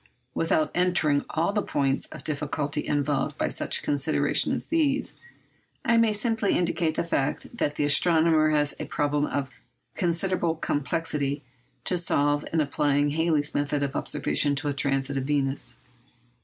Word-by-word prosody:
Without 160 -1 +1
entering 175 -5 +2
on - - -9
all 165 +5 0
the 210 - +1
points 135 -5 0
of - - -11
difficulty 150 0 -2
involved 145 -1 0
by - - 0
such - - -1
considerations 145 +2 +1
as - - -2
these, 295 -4 +1 0.7
I 235 -1 +4
may 230 -1 +4
simply 220 -1 0
indicate 170 -2 0
the - - 0
fact 145 - -2
that 145 -10 -1
the - - 0
astronomer 160 +1 +4
has 145 -1 +2
a - - -3
problem 145 0 0
of 135 -2 -3 0.4
considerable 175 -1 0
complexity 145 -1 -2 0.4
to 180 - +1
solve 145 -3 +1
in 160 - +2
applying 145 0 +1
Halley's 155 -2 0
method 145 0 0
of 140 -1 -3
observation 145 0 +1
to 145 +2 -1
a - - -1
transit 135 0 0
of 135 - -2
Venus. 140 -1 -1
150 Hz, 155 wpm, -26 LUFS, 145-170 Hz, 0.7 s, I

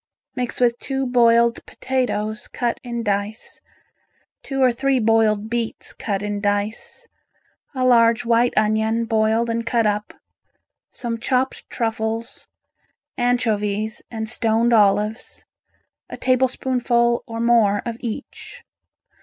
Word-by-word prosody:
Mix 250 -1 -2
with 240 -1 +2
two 270 -1 -2
boiled 235 -1 +3
potatoes 240 -4 -2
cut 240 -1 -2
in 235 -2 -4
dice, 205 +1 -3 0.8
two 270 -1 -5
or 255 - +5
three 270 +3 +1
boiled 220 -2 +2
beets 235 0 -4
cut 200 -2 -3
in 205 -1 -3
dice, 205 +1 -2 0.7
a 255 -1 0
large 235 -1 +4
white 235 +1 +3
onion 220 +2 +1
boiled 225 +1 +1
and 230 0 -1
cut 230 -1 +1
up, 210 0 -1 0.8
some 230 -2 -4
chopped 255 +2 -1
truffles, 225 0 -3 0.7
anchovies 220 -3 0
and 220 -1 -5
stoned 230 +1 +1
olives, 210 +1 +1 0.6
a - - -7
tablespoonful 250 -2 +1
or 230 0 -6
more 230 -4 +3
of 235 -1 -3
each. 275 - -7
230 Hz, 115 wpm, -21 LUFS, 220-245 Hz, 0.8 s, or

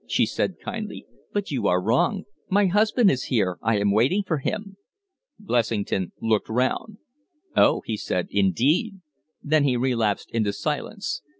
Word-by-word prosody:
she - - +2
said, - - -2
kindly. 220 -3 -6 0.3
"But 205 -4 -2
you 120 -7 0
are 90 - +3
wrong. 125 - +1 0.3
My 200 +1 +3
husband 210 +3 +3
is 130 - -2
here 95 -7 0
I 115 -1 +1
am 100 0 +2
waiting 130 - +2
for 160 -5 -1
him." 200 +6 -4 0.6
Blessington 115 - -1
looked 110 -2 0
round. 130 - -1 0.6
"Oh!" - - +4
he 110 - -2
said. 90 -3 -2
"Indeed!" 125 - +2 0.5
Then 155 0 +3
he 130 -3 +2
relapsed 115 -5 0
into 110 -3 0
silence. 100 0 -3
125 Hz, 145 wpm, -24 LUFS, -, 0.6 s, Oh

